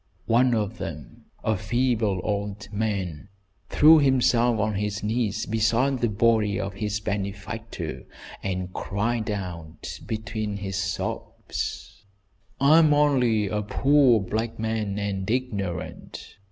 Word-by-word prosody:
One 120 +2 +3
of 110 +1 -2
them, 75 -3 -8 0.2
a 110 - +1
feeble 110 -2 0
old 100 -1 -3
man, 100 -5 -2 0.4
threw 155 +2 +7
himself 125 -4 +3
on 110 +1 +1
his 105 +1 -2
knees 110 0 -1
beside 115 +5 +1
the 120 - +1
body 105 -1 +2
of 100 0 -3
his 105 +1 -2
benefactor, 100 -2 -5 0.3
and 90 -1 -3
cried 110 +3 -2
out 90 -6 -6
between 110 -1 -3
his 95 -1 -4
sobs: 95 0 -4 0.6
"I 150 +4 +6
am 155 -2 +5
only 125 -8 +3
a 105 +1 -1
poor 135 +2 +4
black 110 +4 -3
man, 110 -2 -2
and 100 -1 -3
ignorant. 105 -8 -4
105 Hz, 120 wpm, -25 LUFS, 100-120 Hz, 0.6 s, threw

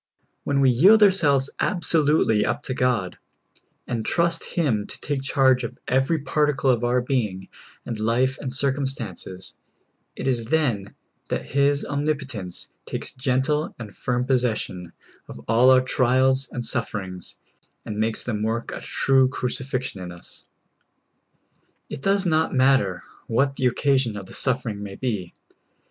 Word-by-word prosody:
When 140 -1 +1
we 130 -1 +5
yield 195 - +6
ourselves 145 -9 +3
absolutel}^ 150 -10 +3
up 145 - -2
to 130 - -3
God, 125 -8 0 0.7
and 115 -2 -3
trust 170 +3 +1
Him 120 -12 -1
to - - -8
take 145 -2 -3
charge 135 -2 +3
of 115 - -6
every 135 +6 +2
particle 145 -2 +2
of 120 -1 0
our 125 +1 +2
being 110 -8 -2 0.4
and 115 -3 -5
life 125 +4 +1
and 130 - -4
circumstances, 130 - -2 0.6
it - - -6
is 120 -3 0
then 120 -8 0 0.3
that - - -3
His 140 +1 +2
omnipotence 140 - -4
takes - - -3
gentle 135 +4 0
and 110 -4 -9
firm 125 0 -1
possession 115 -9 -1 0.4
of - - -10
all 120 +3 +5
our 130 -1 +6
trials 130 +1 +2
and 120 -1 -4
suffer 105 - -2
ings, 90 -9 -6 0.5
and 105 -1 -5
makes 110 0 0
them 110 -4 -3
work 115 +2 -2
a - - -6
true 135 -1 +2
crucifixion 130 -4 -3
in 90 -1 -6
us. 85 0 -13 1.5
It - - -6
does 195 +4 +1
not 160 -3 +1
matter 130 -9 +3 0.2
what 135 +4 +1
the 130 - +1
occasion 130 -3 +1
of 100 - -7
the - - -13
suffer 125 -2 0
ing 105 -2 -5
ma}^ 100 -1 -8
be. 105 -9 -3
130 Hz, 150 wpm, -24 LUFS, 110-140 Hz, 1.5 s, yield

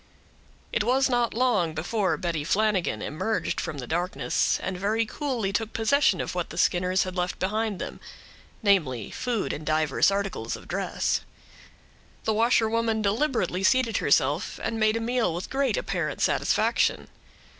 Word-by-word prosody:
It - - +2
was 265 +4 +2
not 240 -2 +1
long 210 -10 +1
before 190 +5 0
Betty 165 -4 -2
Flanagan 190 - +1
emerged 220 +9 -2
from 150 - -5
the 130 - -5
darkness, 160 -5 0
and 190 - -2
very 215 +5 0
coolly 235 -6 -2
took 225 +1 -2
possession 280 +6 +3
of - - -3
what - - -2
the - - -9
Skinners 180 +1 +2
had 185 0 -6
left 180 0 -1
behind 210 +2 -1
them; - - -6 0.6
namely, 155 - +2
food 240 -5 -2
and 155 - -6
divers 155 0 +2
articles 195 - -2
of - - -12
dress. - - -1 1.0
The 220 - +1
washerwoman 225 -1 +2
deliberately 210 -3 0
seated 250 +2 +3
herself, - - +1
and 225 - -2
made 215 +1 +3
a - - -1
meal 235 -6 0
with 175 - -6
great 275 - +1
apparent - - -2
satisfaction. - - +1
210 Hz, 150 wpm, -26 LUFS, 180-230 Hz, 1.0 s, possession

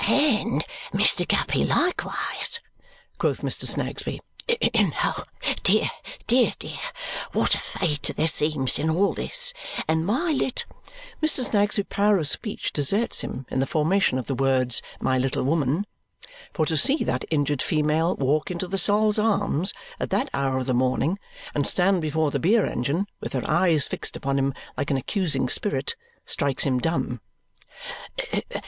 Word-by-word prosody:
"And 280 -6 +3 0.3
Mr. - - +3
Guppy - - +1
likewise!" 365 +5 0 0.6
quoth - - 0
Mr. - - -1
Snagsby. - - -1 1.4
"Dear, - - +3 0.4
dear, 245 +2 +3
dear! - - -7 0.5
What - - +2
a - - +1
fate 150 -5 -1
there 160 - +2
seems 150 -5 +2
in 155 +2 0
all 185 +6 +2
this! - - -1 0.3
And 160 0 +1
my 265 - 0
lit 265 -3 0 0.3
" - - -18
Mr. 310 -4 +2
Snagsby's 205 -3 +2
power 205 0 +3
of 155 -5 +1
speech 210 +7 0
deserts 200 - +2
him 130 - -6
in - - 0
the 135 - +1
formation 160 -1 +2
of 130 - -3
the 135 - -2
words 130 -2 +1 0.2
"my 130 0 +1
little 130 +1 0
woman." 150 +5 +1 0.7
For 155 - 0
to 160 0 0
see 270 - +3
that - - -1
injured 145 -3 0
female 155 +2 +1
walk 140 +3 0
into 180 0 -3
the 195 +2 -1
Sol's 210 +1 +3
Arms 200 -5 +2 0.3
at - - -2
that - - 0
hour 135 -1 0
of 130 - -2
the 130 - 0
morning 130 +9 +1 0.3
and 145 - +1
stand 185 0 +3
before 155 -1 0
the 140 - -1
beer 205 - +3
engine, 140 - -1
with - - -6
her 130 - -2
eyes 165 -3 +3
fixed - - -3
upon 140 0 -1
him 135 0 0 0.2
like - - -2
an 140 - +2
accusing 145 - -1
spirit, 215 - -1 0.3
strikes 140 -4 -1
him 130 -2 +1
dumb. 125 -6 -1
160 Hz, 155 wpm, -25 LUFS, 140-205 Hz, 1.4 s, And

